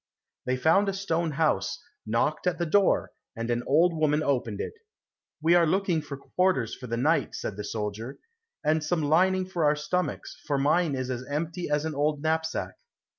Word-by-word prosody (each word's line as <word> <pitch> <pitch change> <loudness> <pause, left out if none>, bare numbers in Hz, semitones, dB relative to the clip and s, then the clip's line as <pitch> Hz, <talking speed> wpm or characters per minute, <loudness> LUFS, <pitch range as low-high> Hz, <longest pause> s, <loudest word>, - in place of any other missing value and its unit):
They 130 0 +1
found 195 +9 +3
a - - -1
stone 170 -5 -1
house, 145 -10 +1 0.3
knocked 130 +10 0
at 180 -1 +1
the 170 - -1
door, 195 +4 +2 0.2
and 115 +1 -3
an 120 0 0
old 165 +4 +4
woman 155 -1 +2
opened 120 -7 -1
it. - - -4 0.7
"We 165 +2 +5
are 175 -1 +5
looking 180 -1 +1
for 145 -2 -7
quarters 155 - 0
for 125 - -8
the 115 0 -2
night," 155 +7 +1
said 105 - -4
the 105 - -5
soldier, 110 +4 -4 0.5
"and 155 +1 +2
some 160 0 0
lining 185 +5 +3
for 180 -3 -2
our 150 0 +4
stomachs, 150 +5 -3
for 145 - +1
mine 150 +2 +2
is 130 0 -3
as 125 0 -4
empty 165 +4 -3
as 150 +1 +1
an 160 - -2
old 145 +1 0
knapsack." 160 0 -1
155 Hz, 185 wpm, -27 LUFS, 135-170 Hz, 0.7 s, We